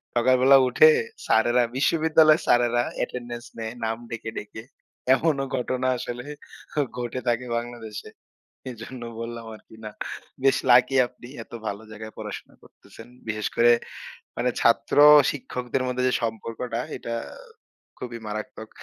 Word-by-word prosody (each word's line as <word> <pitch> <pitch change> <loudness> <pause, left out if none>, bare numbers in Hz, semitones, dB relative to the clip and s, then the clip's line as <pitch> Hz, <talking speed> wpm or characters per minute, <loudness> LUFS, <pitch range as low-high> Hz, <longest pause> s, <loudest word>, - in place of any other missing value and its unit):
সকালবেলা 130 +3 +5
উঠে 470 - +7 0.4
স্যারেরা 120 +2 +3
বিশ্ববিদ্যালয়ের 155 +2 +4
স্যারেরা 120 0 +3
অ্যাটেনডেন্স 120 -1 -5
নেয় 110 0 -5
নাম 110 0 -1
ডেকে, 115 -1 -5
ডেকে। 105 +1 -7 0.5
এমনও 140 -3 0
ঘটনা 130 +1 -1
আসলে 120 +1 -6 0.7
ঘটে 120 +1 -3
থাকে 120 +1 +1
বাংলাদেশে। 115 -3 -7 0.6
এজন্য 120 +1 -9 0.2
বললাম 115 0 -6
আরকি, 110 - -17
না। 105 - -6 0.5
বেশ 135 - +4
লাকি 125 +2 +5
আপনি 120 -1 -15 0.2
এত - - -33 0.2
ভালো 100 +2 -4
জায়গায় 110 0 -9
পড়াশোনা - - -8
করতেছেন। 115 - -16 0.2
বিশেষ 110 -1 -2
করে 120 0 +5 0.7
মানে 125 +1 +1
ছাত্র-শিক্ষকদের 130 0 +4
মধ্যে 125 0 -1
যে - - 0
সম্পর্কটা, 115 +1 -3 0.2
এটা 115 - -5 0.8
খুবই 120 -2 -6
মারাত্মক। 110 +1 -6
120 Hz, 120 wpm, -25 LUFS, 115-130 Hz, 0.8 s, উঠে